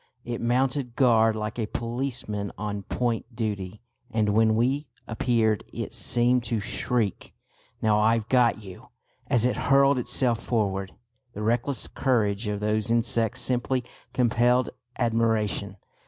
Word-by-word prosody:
It 120 Hz, -1 st, -4 dB
mounted 125 Hz, +1 st, 0 dB
guard 115 Hz, -4 st, +4 dB
like 110 Hz, +2 st, -4 dB
a 110 Hz, -, -1 dB
policeman 115 Hz, -4 st, -3 dB
on 105 Hz, -1 st, -3 dB
point 115 Hz, +2 st, -2 dB
duty, 105 Hz, -3 st, -4 dB, 0.3 s
and 110 Hz, -3 st, +1 dB
when 110 Hz, +1 st, +3 dB
we 135 Hz, +6 st, 0 dB, 0.2 s
appeared 115 Hz, -2 st, +1 dB
it -, -, -5 dB
seemed 120 Hz, +1 st, +2 dB
to 115 Hz, -1 st, -1 dB
shriek, 110 Hz, 0 st, -2 dB, 0.5 s
"Now 105 Hz, -1 st, +3 dB
I've 110 Hz, 0 st, +2 dB
got 120 Hz, -4 st, +3 dB
you!" 95 Hz, -2 st, -11 dB, 0.4 s
as 120 Hz, -1 st, +3 dB
it 125 Hz, -, +1 dB
hurled 140 Hz, -1 st, +5 dB
itself 120 Hz, -1 st, 0 dB
forward. 100 Hz, -5 st, -1 dB, 0.4 s
The 105 Hz, -, -5 dB
reckless 120 Hz, +2 st, 0 dB
courage 110 Hz, -5 st, 0 dB
of 105 Hz, 0 st, -2 dB
those 105 Hz, 0 st, 0 dB
insects 115 Hz, -1 st, +1 dB
simply 125 Hz, 0 st, 0 dB, 0.3 s
compelled 120 Hz, +1 st, +2 dB, 0.3 s
admiration. 110 Hz, -4 st, 0 dB
115 Hz, 130 wpm, -26 LUFS, 105-125 Hz, 0.5 s, hurled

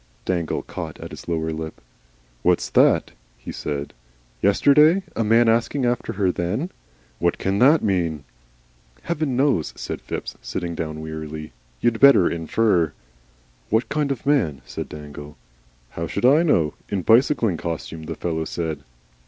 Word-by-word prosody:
Dangle 85 Hz, -3 st, -1 dB
caught -, -, -7 dB
at -, -, -8 dB
his -, -, -10 dB
lower 80 Hz, -1 st, -1 dB
lip. 80 Hz, 0 st, -6 dB, 0.6 s
"What's -, -, +1 dB
that?" -, -, +4 dB, 0.3 s
he -, -, -8 dB
said. 70 Hz, -1 st, -4 dB, 0.5 s
"Yesterday! 150 Hz, -, +5 dB
A 115 Hz, -, +1 dB
man 115 Hz, +2 st, +4 dB
asking 115 Hz, +4 st, +2 dB
after 120 Hz, 0 st, -1 dB
her 95 Hz, -3 st, +1 dB
then! 105 Hz, -, -2 dB, 0.5 s
What 85 Hz, 0 st, +1 dB
can 95 Hz, +1 st, -1 dB
THAT 145 Hz, +6 st, +5 dB
mean?" 85 Hz, -7 st, 0 dB, 0.8 s
"Heaven 155 Hz, -6 st, -1 dB
knows," 130 Hz, -, +1 dB
said -, -, -5 dB
Phipps, -, -, -5 dB
sitting 85 Hz, -2 st, -4 dB
down 80 Hz, -1 st, -4 dB
wearily. 80 Hz, 0 st, -6 dB, 0.3 s
"You'd 115 Hz, -2 st, +1 dB
better 140 Hz, -10 st, +7 dB
infer." 85 Hz, -1 st, +1 dB, 0.8 s
"What 110 Hz, +3 st, +1 dB
kind 150 Hz, -2 st, 0 dB
of 135 Hz, -, -4 dB
man?" 90 Hz, -, +1 dB
said -, -, -6 dB
Dangle. 75 Hz, 0 st, -9 dB, 0.5 s
"How 85 Hz, 0 st, -4 dB
should 100 Hz, +8 st, -2 dB
I 140 Hz, +5 st, +6 dB
know? 85 Hz, -, +2 dB, 0.2 s
in 95 Hz, -3 st, -2 dB
bicycling 115 Hz, -, +3 dB
costume, 80 Hz, -1 st, -5 dB
the -, -, -5 dB
fellow 80 Hz, -2 st, -2 dB
said." 80 Hz, -2 st, -3 dB
90 Hz, 145 wpm, -23 LUFS, 80-125 Hz, 0.8 s, better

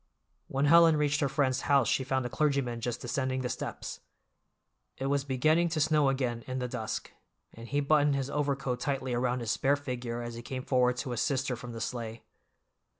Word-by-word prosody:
When 135 Hz, +1 st, 0 dB
Helen 165 Hz, +1 st, +7 dB
reached 145 Hz, 0 st, +1 dB
her 140 Hz, -, +1 dB
friend's 135 Hz, -2 st, +1 dB
house 140 Hz, -5 st, +3 dB
she 130 Hz, -, +1 dB
found 130 Hz, -1 st, -1 dB
the -, -, -2 dB
clergyman 140 Hz, -6 st, 0 dB
just 120 Hz, 0 st, -3 dB
descending 130 Hz, +1 st, -1 dB
the 125 Hz, -, -2 dB
steps. -, -, -5 dB, 1.0 s
It 135 Hz, -, -3 dB
was 140 Hz, -1 st, +1 dB
beginning 155 Hz, +6 st, +2 dB
to 160 Hz, -1 st, -1 dB
snow 150 Hz, -2 st, +3 dB
again 125 Hz, -3 st, -1 dB
in 130 Hz, 0 st, -3 dB
the 125 Hz, -1 st, -2 dB
dusk, 120 Hz, -3 st, -4 dB, 0.4 s
and 115 Hz, +1 st, -10 dB
he 145 Hz, +2 st, 0 dB
buttoned 145 Hz, 0 st, +3 dB
his 135 Hz, 0 st, -2 dB
overcoat 140 Hz, -3 st, -1 dB
tightly 130 Hz, -1 st, -2 dB
around 125 Hz, +1 st, 0 dB
his 115 Hz, -1 st, -1 dB
spare 140 Hz, +1 st, +2 dB
figure 125 Hz, -4 st, -4 dB
as 120 Hz, 0 st, -5 dB
he 115 Hz, -, -7 dB
came 130 Hz, +1 st, -5 dB
forward 125 Hz, -2 st, +2 dB
to 130 Hz, 0 st, -3 dB
assist 130 Hz, +3 st, 0 dB
her 125 Hz, -, -1 dB
from 120 Hz, 0 st, -8 dB
the 115 Hz, -, -6 dB
sleigh. 115 Hz, -2 st, -4 dB
130 Hz, 200 wpm, -30 LUFS, 125-145 Hz, 1.0 s, Helen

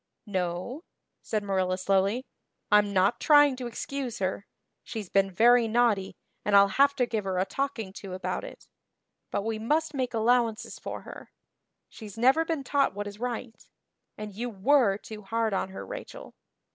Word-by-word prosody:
"No," 185 Hz, -, -3 dB, 0.4 s
said 215 Hz, -2 st, -2 dB
Marilla 190 Hz, -2 st, 0 dB
slowly, 195 Hz, +6 st, +1 dB, 0.5 s
"I'm 210 Hz, -1 st, +5 dB
not 195 Hz, +3 st, +2 dB
trying 290 Hz, -3 st, +6 dB
to 250 Hz, -1 st, -4 dB
excuse 255 Hz, +1 st, -5 dB
her. 190 Hz, +1 st, -3 dB, 0.4 s
She's 210 Hz, -5 st, -6 dB
been 195 Hz, 0 st, +3 dB
very 235 Hz, +4 st, +5 dB
naughty 220 Hz, -4 st, +1 dB, 0.3 s
and 205 Hz, -, +2 dB
I'll 200 Hz, 0 st, +7 dB
have 280 Hz, +6 st, +3 dB
to 250 Hz, -, +2 dB
give 220 Hz, -3 st, -2 dB
her 190 Hz, -1 st, -1 dB
a 185 Hz, -, +2 dB
talking 260 Hz, -6 st, -3 dB
to 195 Hz, -2 st, -7 dB
about 185 Hz, -, -3 dB
it. -, -, -11 dB, 0.6 s
But 200 Hz, -, -2 dB
we 225 Hz, -1 st, -2 dB
must 305 Hz, +7 st, 0 dB
make 255 Hz, -3 st, -2 dB
allowances 230 Hz, 0 st, +1 dB
for -, -, -6 dB
her. -, -, -11 dB, 0.6 s
She's 215 Hz, -2 st, -11 dB
never 265 Hz, +7 st, +4 dB
been 325 Hz, -4 st, -2 dB
taught 275 Hz, -5 st, +1 dB
what 205 Hz, 0 st, -4 dB
is 205 Hz, 0 st, -8 dB
right. 245 Hz, -1 st, -5 dB, 0.5 s
And 210 Hz, -1 st, -7 dB
you 240 Hz, +5 st, -4 dB
were 225 Hz, 0 st, +3 dB
too 215 Hz, 0 st, -10 dB
hard 220 Hz, +2 st, -1 dB
on 190 Hz, -, -1 dB
her, 190 Hz, -, -8 dB
Rachel." -, -, -9 dB
220 Hz, 170 wpm, -28 LUFS, 195-255 Hz, 0.6 s, I'll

